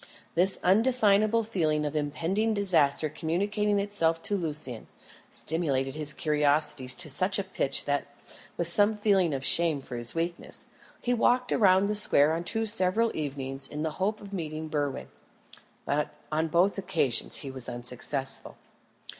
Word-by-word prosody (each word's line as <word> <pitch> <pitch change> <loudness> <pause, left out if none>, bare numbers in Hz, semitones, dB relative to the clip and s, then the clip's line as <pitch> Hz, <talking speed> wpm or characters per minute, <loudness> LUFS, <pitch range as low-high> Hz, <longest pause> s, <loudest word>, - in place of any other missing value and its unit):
This 185 +3 +3
undefinable 215 +1 +3
feeling 155 -8 -1
of 150 +1 -4
impending 170 +9 -1
disaster 160 -7 +3
communicating 200 +7 -1
itself 185 -5 0
to 205 - 0
Lucian, 150 - -3 0.4
stimulated 140 -5 -2
his 150 0 -3
curiosity 150 -3 +1
to 155 +7 -3
such 185 +7 +2
a 200 - -1
pitch 190 -7 -2
that, 145 0 -1 0.5
with 170 - 0
some 205 +5 +3
feeling 200 -5 +2
of 135 -2 -2
shame 165 -4 +3
for 130 -2 -9
his 120 +3 +2
weakness, 170 +1 -4 0.4
he 245 - 0
walked 245 +1 +2
round 190 -2 +4
the 210 - -1
square 160 -7 +4
on 165 +1 -3
two 225 +5 -1
several 220 +1 +2
evenings 135 -2 -3
in 150 +1 -5
the 160 - -2
hope 210 +3 0
of 200 -1 -11
meeting 155 -3 -5
Berwin. 145 -3 -3 0.8
But 150 +1 -1 0.2
on 160 +1 0
both 180 +5 +2
occasions 170 -11 +1
he 135 - -5
was 130 -2 -6
unsuccessful. 125 +3 -5
165 Hz, 150 wpm, -27 LUFS, 145-200 Hz, 0.8 s, round